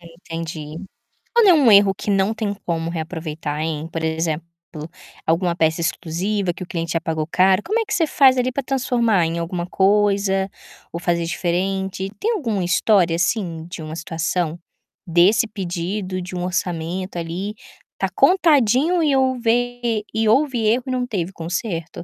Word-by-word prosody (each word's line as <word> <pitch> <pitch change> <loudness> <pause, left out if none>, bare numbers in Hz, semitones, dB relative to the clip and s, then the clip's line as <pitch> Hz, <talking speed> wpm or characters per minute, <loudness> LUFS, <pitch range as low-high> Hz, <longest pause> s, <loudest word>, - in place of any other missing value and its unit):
Entendi. 165 -2 -7 0.6
Quando 460 -4 +6
é - - +9
um 275 -7 +5
erro 200 -1 +6
que 210 - -3
não 195 +2 +2
tem 215 -2 -2
como 165 -1 -1
reaproveitar, 160 -2 -4
hein? 160 0 -3
Por 165 - -3
exemplo, 160 0 -1 0.8
alguma 170 +2 +1
peça 160 0 +1
exclusiva 175 +4 -1
que 185 - -9
o - - -6
cliente 170 -2 -3
já 165 - 0
pagou 160 -2 -2
caro, 190 +2 +4
como 435 +4 0
é - - -1
que 430 - -3
você 330 -2 +2
faz 265 -3 +5
ali 250 0 +1
para 275 - -2
transformar 240 -7 +1
em 165 +1 -3
alguma 175 +1 -3
coisa, 195 0 +2 0.4
ou 170 - -4
fazer 170 -1 0
diferente. 190 +3 -2
Tem 460 - 0
alguma 230 - -1
história, 175 -2 +3
assim, 170 -3 -1
de 165 - -7
uma 155 0 -6
situação? 165 0 -2 0.5
Desse 180 +7 +4
pedido 185 -1 -4
de 180 +1 -7
um 180 - -2
orçamento 180 0 -3
ali, 180 +5 -4 0.4
está 195 - -1
contadinho 310 - +4
e 285 -3 +3
houver 245 -3 0
e 220 0 +1
houve 265 +2 +3
erro 240 +3 +2
e 260 - -4
não 250 -1 -1
teve 190 -5 -3
conserto? 170 0 -4
185 Hz, 165 wpm, -21 LUFS, 165-225 Hz, 0.8 s, é